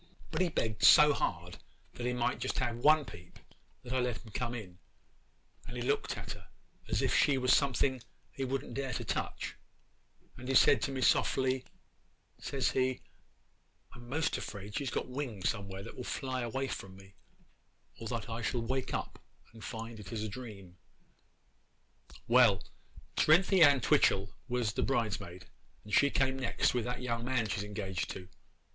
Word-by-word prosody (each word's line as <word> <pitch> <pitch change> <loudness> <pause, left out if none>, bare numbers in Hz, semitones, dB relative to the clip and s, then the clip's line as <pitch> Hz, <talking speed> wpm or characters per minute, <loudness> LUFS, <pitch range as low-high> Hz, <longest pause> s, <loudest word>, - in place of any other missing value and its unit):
'But - - -1
he 180 - +3
begged 110 -8 -2
so 150 -1 +8
hard 90 - -3 0.3
that 120 - -4
he 125 - 0
might 120 -1 0
just - - -2
have 120 -1 -1
one 150 +4 +5
peep, 105 -5 -12 0.5
that 125 0 -6
I 130 - +2
let 125 -2 0
him 110 - -12
come 120 +2 -3
in, 95 -6 -9 0.9
and 120 - -8
he 120 - -3
looked - - 0
at - - -6
her - - -10 0.4
as - - +1
if - - +2
she 140 -2 +4
was 125 0 +3
something 130 -1 +1 0.3
he 135 - -4
wouldn't 130 -1 -3
dare 135 0 -3
to - - -4
touch, - - -3 0.8
and 125 0 -9
he 135 - 0
said 130 -2 +6
to - - -1
me 130 -1 -3
softly, 130 +1 +2 0.7
says 135 -3 -1
he, 130 -1 0 0.9
"I'm 120 0 -12
'most 155 +3 0
afraid 100 0 -7
she 140 - -2
has - - -1
got - - -2
wings 125 -7 -3
somewhere 100 -3 -5
that - - -9
will 125 - -6
fly 130 0 -3
away 135 +3 -2
from 95 -6 -6
me, 95 0 -15 0.9
or 115 - -5
that 115 -1 -3
I 115 0 -4
shall 115 +2 -1
wake 130 +2 -2
up - - -5 0.3
and 115 - -12
find 115 -1 -6
it 105 - -10
is 110 -2 -3
a - - -2
dream." 100 -6 -9 1.5
'Well, 115 -5 +5 0.5
Cerinthy 180 +4 +5
Ann 140 -4 +7
Twitchel 100 -9 +3
was 120 -4 0
the - - -1
bridesmaid, 105 -8 -2 0.4
and 105 - -10
she 140 - +5
came 135 -1 +1
next 130 - +1
with 125 -2 -1
that 125 +1 -4
young 115 -2 -2
man 125 -3 0
she 105 - -2
is 100 - -2
engaged 100 -3 -4
to. 90 0 -7
120 Hz, 180 wpm, -32 LUFS, 105-130 Hz, 1.5 s, so